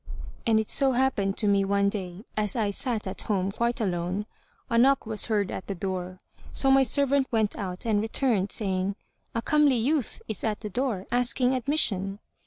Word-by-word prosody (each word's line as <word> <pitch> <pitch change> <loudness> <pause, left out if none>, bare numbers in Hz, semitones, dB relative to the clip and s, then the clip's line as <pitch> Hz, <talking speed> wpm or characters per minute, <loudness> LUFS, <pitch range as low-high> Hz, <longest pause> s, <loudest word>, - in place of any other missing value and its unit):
And 220 -1 +4
it 220 - -2
so 270 -2 +3
happened 240 -7 +1
to 210 - +1
me 200 -1 +3
one 200 0 +2
day, 195 0 -4
as 210 -2 0
I 215 -4 0
sat 230 +1 -1
at 190 - -4
home 195 -2 -1
quite 235 +3 -1
alone, 185 0 -2 0.4
a 235 - -2
knock 270 +2 +4
was 220 -1 0
heard 205 -4 0
at - - -6
the 195 - -3
door; 185 0 -4 0.3
so 270 - +3
my 270 0 +6
servant 275 +1 +2
went 220 -3 0
out 185 -1 -5
and 210 -2 +2
returned, 220 -3 0
saying, 190 -1 -1 0.4
"A 230 - -1
comely 300 -3 +4
youth 265 +2 0
is 220 - -3
at 215 -2 -1
the 210 -2 -6
door, 230 -5 -2
asking 245 +1 +2
admission." 220 -8 0
215 Hz, 190 wpm, -27 LUFS, 195-250 Hz, 0.4 s, my